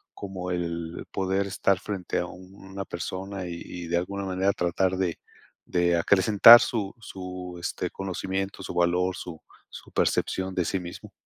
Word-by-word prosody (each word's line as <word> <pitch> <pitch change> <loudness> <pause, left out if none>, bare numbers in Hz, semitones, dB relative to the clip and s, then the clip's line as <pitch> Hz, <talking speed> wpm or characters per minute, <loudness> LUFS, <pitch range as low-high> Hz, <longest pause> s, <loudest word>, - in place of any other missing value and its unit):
como 95 -2 -5
el 85 -1 -3
poder 95 +1 0
estar 100 -1 +1
frente 100 -2 -3
a 90 - -2
una 95 +2 -9
persona 95 +2 -5
y 85 -1 -6
y, 85 -1 -7
de 85 - +1
alguna 100 +3 -3
manera, 95 +1 +1
tratar 90 +1 +1
de 90 -3 -1 0.5
de 85 -1 +2
acrecentar 100 +6 +8
su 105 -5 -2
su, 90 -3 -7
este, 85 +1 -3
conocimiento, 95 +1 -4
su - - -6
valor, 90 +1 +2
su 80 -3 -8 0.3
su - - -12
percepción 95 0 0
de 90 - +1
sí 95 - -1
mismo. 85 -1 -9
95 Hz, 155 wpm, -26 LUFS, 90-95 Hz, 0.5 s, acrecentar